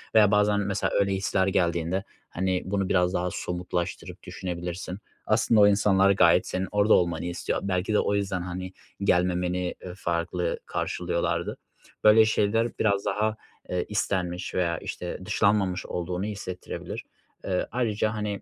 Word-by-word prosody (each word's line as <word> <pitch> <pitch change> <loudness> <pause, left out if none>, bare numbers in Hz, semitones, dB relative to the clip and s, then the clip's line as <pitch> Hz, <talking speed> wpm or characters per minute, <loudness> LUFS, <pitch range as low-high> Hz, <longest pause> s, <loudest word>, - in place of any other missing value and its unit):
veya 105 -2 +6
bazen 105 0 +3
mesela 100 0 -1
öyle 100 -1 +2
hisler 95 0 +1
geldiğinde, 85 0 0 0.3
hani, 95 0 -1
bunu 95 0 -1
biraz 90 -1 +2
daha 90 0 0
somutlaştırıp 90 0 -4
düşünebilirsin. 90 +1 -5 0.3
Aslında 110 0 +4
o 100 - +8
insanlar 100 -1 +4
gayet 100 - +4
senin 95 +1 -2
orada 105 +1 +4
olmanı 85 -2 +2
istiyor. 85 0 -2
Belki 95 +1 -1
de 105 - +4
o 100 - +1
yüzden, 95 -2 -1
hani, 90 +1 -5 0.3
gelmemeni, 90 -1 +1
ııı, 90 - -7
farklı 85 -1 -2
karşılıyorlardı. - - -2 0.5
Böyle 110 +1 +7
şeyler 110 +2 +1
biraz 100 -2 +1
daha, 105 +2 0 0.3
eee, 90 -1 -1
istenmiş 90 -3 -2
veya, 85 -2 +1
işte, 90 +2 -5
dışlanmamış 100 -3 +1
olduğunu 90 +2 -3
hissettirebilir. 100 -4 -6 0.4
Iıı, 95 -2 -1
ayrıca, 110 -3 0
hani, 105 -2 -3
95 Hz, 140 wpm, -26 LUFS, 90-105 Hz, 0.5 s, o